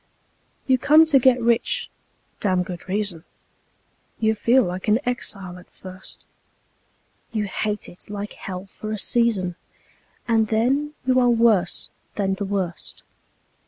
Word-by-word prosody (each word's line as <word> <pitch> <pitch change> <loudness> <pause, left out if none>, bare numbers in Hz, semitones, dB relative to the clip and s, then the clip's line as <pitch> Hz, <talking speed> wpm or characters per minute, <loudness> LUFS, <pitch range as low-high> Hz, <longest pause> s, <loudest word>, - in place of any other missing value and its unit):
You 260 -1 +3
come 310 +5 +6
to 295 -4 +4
get 255 0 +4
rich 235 0 +1 0.5
(damned 185 -3 +1
good 180 0 -8
reason); 195 -4 -1 1.0
You 220 -1 +3
feel 235 +4 +3
like 180 +1 -4
an 210 +1 +5
exile 195 -7 -3
at 180 - -17
first; 185 0 -11 1.1
You 215 -2 -1
hate 210 +1 -2
it 175 - -15
like 205 0 -5
hell 185 0 -7
for 215 +2 -8
a 215 - -2
season, 200 -5 +1 0.7
And 225 -2 +3
then 270 +8 +1
you 255 0 +4
are 245 -1 +4
worse 225 -6 +2 0.3
than 195 -2 0
the 200 +1 -3
worst. 190 -4 -4
210 Hz, 135 wpm, -23 LUFS, 190-235 Hz, 1.1 s, come